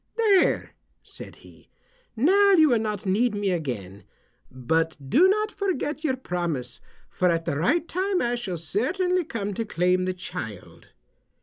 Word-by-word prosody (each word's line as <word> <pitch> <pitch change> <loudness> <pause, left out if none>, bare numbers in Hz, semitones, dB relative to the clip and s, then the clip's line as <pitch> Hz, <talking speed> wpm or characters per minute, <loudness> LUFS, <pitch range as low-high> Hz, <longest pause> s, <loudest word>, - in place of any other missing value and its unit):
"There," 425 -5 +2 0.3
said - - -11
he, - - -19 0.5
"now 395 - +4
you 315 -4 +6
will 240 -3 +3
not 210 -3 -3
need 210 +4 +1
me 205 -2 -1
again. 110 - -4 0.5
But 160 +6 -1
do 360 +5 +6
not 425 +2 +1
forget 330 -6 -3
your 270 -5 +1
promise, 170 - -4 0.3
for 180 - 0
at 165 -1 0
the 140 - -2
right 300 - +1
time 375 +1 -1
I 240 0 0
shall 205 -8 -4
certainly 355 - 0
come 205 -9 -4
to 225 - -2
claim 185 -2 +1
the 185 0 -2
child." 110 - -8
210 Hz, 150 wpm, -25 LUFS, -, 0.5 s, you